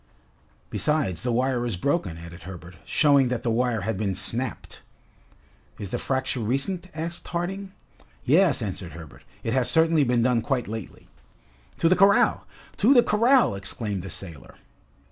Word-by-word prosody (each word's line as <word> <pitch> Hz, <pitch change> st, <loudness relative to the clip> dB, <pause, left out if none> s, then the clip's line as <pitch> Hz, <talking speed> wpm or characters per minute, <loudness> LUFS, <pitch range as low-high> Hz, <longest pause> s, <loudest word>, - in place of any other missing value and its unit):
"Besides, 140 Hz, -, 0 dB
the 125 Hz, -, -1 dB
wire 125 Hz, +1 st, 0 dB
is 120 Hz, -5 st, -1 dB
broken," 95 Hz, -, -1 dB
added 85 Hz, +1 st, -10 dB
Herbert, 90 Hz, -1 st, -10 dB
showing 140 Hz, -4 st, +4 dB
that 125 Hz, -1 st, -2 dB
the 115 Hz, -, 0 dB
wire 120 Hz, -1 st, 0 dB
had 100 Hz, 0 st, -3 dB
been 100 Hz, -3 st, -1 dB
snapped. 115 Hz, +4 st, -3 dB, 1.0 s
"Is 100 Hz, -2 st, -7 dB
the 120 Hz, -, -2 dB
fracture 130 Hz, 0 st, -2 dB
recent?" 140 Hz, -, -2 dB
asked 165 Hz, +2 st, -5 dB
Harding. 190 Hz, +3 st, -4 dB, 0.5 s
"Yes," 155 Hz, -2 st, +4 dB
answered 95 Hz, -4 st, -5 dB
Herbert, 80 Hz, -4 st, -11 dB, 0.2 s
"it 115 Hz, -, -1 dB
has 130 Hz, -2 st, +1 dB
certainly 160 Hz, -2 st, +4 dB
been 120 Hz, -2 st, +2 dB
done 120 Hz, -1 st, +2 dB
quite 125 Hz, -1 st, -1 dB
lately." 110 Hz, -2 st, -8 dB, 0.7 s
"To -, -, +2 dB
the 185 Hz, -, +5 dB
corral! 195 Hz, +1 st, +4 dB, 0.3 s
to 250 Hz, +8 st, +4 dB
the 240 Hz, -, +7 dB
corral!" 240 Hz, -, +3 dB
exclaimed 100 Hz, 0 st, -3 dB
the 95 Hz, -, -8 dB
sailor. 85 Hz, -6 st, -8 dB
125 Hz, 155 wpm, -25 LUFS, 100-160 Hz, 1.0 s, the